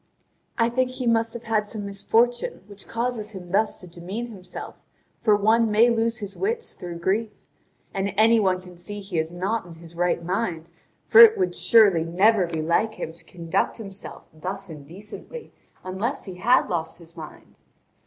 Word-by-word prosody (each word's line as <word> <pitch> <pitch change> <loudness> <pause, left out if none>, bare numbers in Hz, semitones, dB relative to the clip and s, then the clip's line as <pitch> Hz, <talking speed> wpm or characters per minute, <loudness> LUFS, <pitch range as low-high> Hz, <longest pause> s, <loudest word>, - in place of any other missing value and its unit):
I 230 -2 +3
think 255 +2 0
he 255 0 -5
must 230 -1 +2
have 235 - -7
had 215 -2 0
some 210 -3 -5
misfortune, 225 +4 0
which 200 -1 -11
causes 230 -2 -3
him 180 -2 -9
thus 215 +3 +1
to 180 - -11
demean 190 +8 -6
himself, 185 -4 -10 0.3
for 210 -2 +4
one 220 +2 +3
may 225 +3 +5
lose 230 0 +1
his 205 -3 -6
wits 460 +4 -2
through 175 -2 -7
grief. 200 +6 0 0.6
And 195 +1 -1
any 225 +1 +5
one 185 -3 +1
can 180 -1 -13
see 205 +4 -7
that 200 - -10
he 175 -4 0
is 160 +1 -2
not 195 +6 -2
in 170 - -11
his 165 0 -13
right 175 -1 0
mind, 175 -3 -2 0.3
for 450 - +6
it 450 -1 +9
would 370 -2 0
surely 205 -8 +5
never 190 +3 +3
be 160 -2 -3
like 215 +7 +1
him 160 - -5
to 170 +1 -15
conduct 170 +2 -2
himself 200 -3 -9
thus 180 +3 -6
indecently 180 - -10 0.3
unless 195 +8 -3
he 190 - -7
had 245 +8 +3
lost 165 -2 -3
his 170 -1 -16
mind. 155 -2 -12
200 Hz, 185 wpm, -24 LUFS, 175-230 Hz, 0.6 s, it